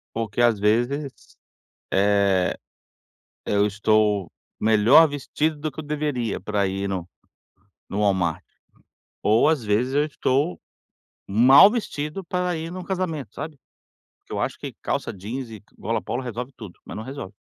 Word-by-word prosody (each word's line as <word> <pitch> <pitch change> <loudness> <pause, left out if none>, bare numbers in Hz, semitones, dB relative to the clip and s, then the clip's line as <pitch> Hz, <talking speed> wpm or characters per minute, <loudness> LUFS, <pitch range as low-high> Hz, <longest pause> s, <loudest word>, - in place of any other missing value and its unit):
Porque, 115 0 -2
às 120 -3 +4
vezes, 120 +7 +1 0.8
eh, 100 -2 +2 0.9
eu 105 0 +2
estou 105 -3 +1 0.3
melhor 110 +9 +6
vestido 150 +2 -2
do 150 +1 -4
que - - -7
eu - - -9
deveria, 145 -7 -2
pra 105 -2 0
ir 95 +1 -2
no 90 -3 -4 0.8
no 100 - -3
Walmart, 95 -6 +1 0.8
ou, 110 +7 +4
às 155 -6 +1
vezes, 110 +6 +1
eu 145 +1 +3
estou 130 - 0 0.7
mal 130 - +8
vestido 185 -6 -4
pra 180 0 -1
ir 160 +1 -5
num 185 0 -6
casamento, 170 - -3
sabe. 155 -2 -7 0.6
Porque - - -20
eu - - -2
acho - - -2
que - - -7
calça - - -2
jeans 115 +6 -6
e 110 -3 -10 0.2
gola 115 - -2
polo 125 - -3
resolve 125 +2 -5
tudo, 105 -7 -11
mas - - -8
não 110 - -5
resolve. 130 -6 -7
120 Hz, 150 wpm, -24 LUFS, 105-150 Hz, 0.9 s, mal